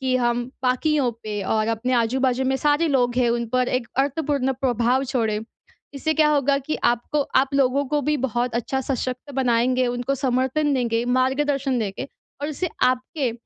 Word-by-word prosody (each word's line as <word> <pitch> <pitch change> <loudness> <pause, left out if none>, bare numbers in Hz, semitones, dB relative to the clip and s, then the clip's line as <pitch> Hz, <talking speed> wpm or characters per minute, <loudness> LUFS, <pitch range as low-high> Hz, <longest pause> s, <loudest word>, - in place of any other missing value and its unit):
कि 260 -1 0
हम 240 -1 0 0.2
बाकियों 260 +1 +1
पे 210 -2 -4
और 215 +3 0
अपने 230 +3 -1
आजू-बाजू 255 +2 +1
में 265 - +1
सारे 295 +4 +2
लोग 245 -4 +1
हैं 250 -2 +3
उन 235 0 -1
पर 255 0 +2
एक 250 -2 -1
अर्थपूर्ण 280 -2 -1
प्रभाव 250 +1 +2
छोड़े। 220 -5 0 0.5
इससे 315 +3 -1
क्या 300 - +5
होगा 280 -1 +2
कि 295 +3 -3 0.2
आपको 265 +5 -2 0.2
आप 275 - -6
लोगों 275 +1 +2
को 295 +1 +1
भी 300 +2 +1
बहुत 240 +1 -2
अच्छा 265 +3 -1
सशक्त 255 +1 -4
बनाएँगे, 250 +1 +2
उनको 245 +2 -1
समर्थन 265 +3 0
देंगे 235 -2 0
मार्गदर्शन 270 0 +1
देके, 220 +5 -4 0.3
और 295 - -1
इससे 340 +4 -2
आपके 255 0 0
255 Hz, 170 wpm, -23 LUFS, 240-275 Hz, 0.5 s, क्या